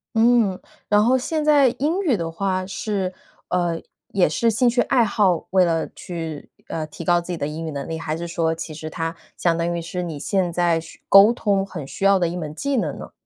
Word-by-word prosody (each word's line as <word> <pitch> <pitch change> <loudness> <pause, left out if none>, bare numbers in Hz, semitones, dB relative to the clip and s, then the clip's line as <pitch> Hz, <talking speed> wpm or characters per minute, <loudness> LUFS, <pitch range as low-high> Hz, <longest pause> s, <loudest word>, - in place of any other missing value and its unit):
嗯， 225 -4 +3 0.3
然 210 0 +4
后 250 +3 +4
现 305 +4 -1
在 290 -3 +5
英 325 +8 0
语 285 - +2
的 165 -1 -3
话， 185 +1 -2
是， 195 -1 -3 0.3
呃， 175 -2 0 0.3
也 190 -5 +2
是 230 +9 +1
兴 235 +3 +2
趣 240 +1 +3
爱 250 -3 +3
好， 195 -5 +1
为 185 -1 +4
了 165 -1 0
去， 165 -4 -6 0.2
呃， 155 -1 -3
提 155 - -10
高 175 +1 +3
自 175 - -6
己 175 - -2
的 145 - -2
英 160 +2 -5
语 - - -3
能 140 0 -5
力， 165 0 -3
还 155 -1 -3
是 170 +1 -5
说 165 -1 0
其 160 -1 -7
实 155 +1 -7
它 165 0 -3 0.2
相 170 -2 +2
当 170 +1 -1
于 170 - -2
是 180 +2 -4
你 160 -4 -5
现 185 -1 0
在 170 -1 +2
需 165 0 -11
沟 200 +3 +8
通 200 -5 0
很 160 -8 -7
需 195 - -5
要 195 -1 +5
的 175 - +1
一 175 - -4
门 155 -3 -5
技 280 - -1
能 230 - -1
呢？ - - -9
180 Hz, 250 characters per minute, -22 LUFS, 165-210 Hz, 0.3 s, 沟